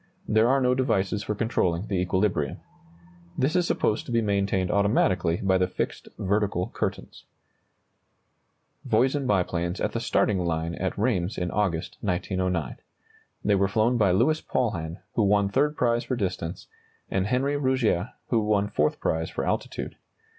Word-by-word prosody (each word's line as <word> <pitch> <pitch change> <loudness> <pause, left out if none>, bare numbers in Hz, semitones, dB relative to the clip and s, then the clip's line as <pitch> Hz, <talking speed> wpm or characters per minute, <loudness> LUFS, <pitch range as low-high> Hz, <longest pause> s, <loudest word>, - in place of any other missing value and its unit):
There 110 +2 +4
are 135 +1 +4
no 125 -1 +3
devices 110 -6 0
for 105 +1 -3
controlling 95 -5 0
the 100 -4 -1
equilibrium. 90 -6 0 0.8
This 135 +6 +1
is 180 -1 +2
supposed 110 - 0
to - - -5
be 115 - +3
maintained 100 -3 0
automatically 95 -4 +2
by 95 -1 +3
the 90 - +2
fixed - - -4
vertical 100 -2 0
curtains. - - -4 1.6
[Illustration: - - -10
Voisin 135 +1 +2
biplanes 90 -3 0
at - - 0
the 115 - -2
starting 105 -4 +1
line 85 -1 -1
at 95 +1 -3
Rheims 100 -4 0
in 90 0 -2
August, 95 -6 -1
1909. 90 -5 -1 0.7
They 105 - +3
were 100 0 +3
flown 110 +5 +2
by 105 -4 +3
Louis 155 +13 +2
Paulhan, 85 -9 -2
who - - +1
won 100 -1 +3
third 150 +7 +1
prize 120 -1 +2
for 130 - -2
distance, 90 -5 -3 0.5
and 95 +1 0
Henri 130 +5 +1
Rougier, 130 -10 +1 0.2
who 115 - +3
won 105 -1 +1
fourth 75 -6 0
prize 80 0 -1
for - - -3
altitude. - - -3
100 Hz, 155 wpm, -26 LUFS, 90-115 Hz, 1.6 s, There